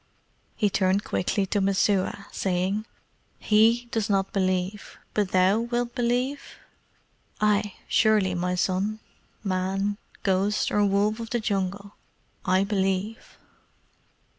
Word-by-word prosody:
He 210 -3 +1
turned 190 +1 +2
quickly 195 +2 0
to 200 +1 0
Messua, 195 0 +1
saying, 190 +4 -1 0.5
"HE 225 +3 +3
does 220 -1 -1
not 195 -1 +1
believe, 185 +1 -1 0.2
but 205 -3 0
thou 185 +3 +3
wilt 240 +1 -2
believe?" 250 +3 0 1.0
"Ay, 210 -1 +1
surely, 215 -4 +3
my 180 +1 -1
son. 190 +4 0 0.4
Man, 195 +1 -1 0.3
ghost, 195 +2 +1
or 210 - +3
wolf 205 +2 +1
of 230 -1 -6
the 240 - 0
Jungle, 200 -1 -2 0.5
I 185 +1 +3
believe." 195 +1 -2
200 Hz, 115 wpm, -26 LUFS, 190-215 Hz, 1.0 s, HE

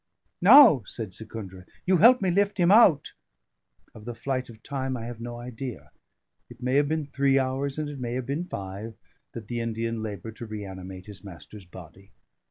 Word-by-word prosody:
"Now," 220 - +8
said 110 -5 -6
Secundra, 95 -3 -9 0.2
"you 185 0 +3
help 235 +4 +6
me 185 - +2
lift 200 +2 +1
him 175 0 +3
out." 195 -10 +5 0.8
Of 105 - -13
the 120 -1 -6
flight 130 +2 -3
of 110 -2 -14
time 130 -2 -3
I 115 - -7
have 120 -1 -8
no 120 0 -6
idea; 120 0 -8 0.6
it 120 0 -14
may 125 +1 -2
have 145 0 +3
been 155 0 -1
three 140 -1 +1
hours, 135 +1 -1
and 155 -1 -2
it 145 -2 -7
may 120 -1 -4
have 130 0 -3
been 145 +7 -3
five, 100 - -7 0.4
that 110 -3 -8
the 120 +2 -3
Indian 115 0 -3
laboured 110 +1 -7
to 115 - -8
reanimate 95 -3 -8
his 105 -1 -12
master's 100 +1 -12
body. 90 +2 -14
120 Hz, 185 wpm, -26 LUFS, 110-140 Hz, 0.8 s, Now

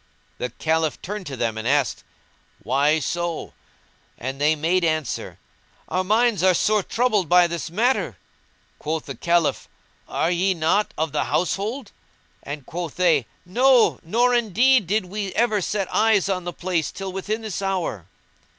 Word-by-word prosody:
The 125 - -2
Caliph 160 +4 -1
turned 205 0 -5
to 135 -2 -6
them 115 -2 -1
and 110 - -4
asked, 140 -1 +1 0.6
"Why 140 +7 +2
so?" 170 +2 -3 0.6
and 135 +3 -5
they 155 +2 +4
made 170 +4 +1
answer, 155 -5 -2 0.5
"Our 185 +1 0
minds 215 0 +2
are 185 -1 +4
sore 215 +3 +2
troubled 215 -5 0
by 180 0 +6
this 170 -1 -4
matter." 235 +9 0 0.6
Quoth 155 +1 -3
the - - -6
Caliph, 170 -2 0 0.4
"Are 165 - 0
ye 185 +2 +1
not 165 +6 +1
of 160 -1 -1
the 150 - 0
household?" 200 - -2 0.5
and 145 -1 -7
quoth 170 0 -5
they, 165 -9 +2 0.2
"No; 250 +6 +4
nor 240 +8 +2
indeed 240 0 +3
did 205 +1 +1
we 200 +1 -4
ever 220 -3 +2
set 195 +1 -1
eyes 215 -3 +3
on 185 -2 -2
the 175 - -3
place 175 -3 -2
till 195 -1 -6
within 210 +4 -3
this 210 -3 -4
hour." 180 - -2
180 Hz, 155 wpm, -23 LUFS, 155-210 Hz, 0.6 s, by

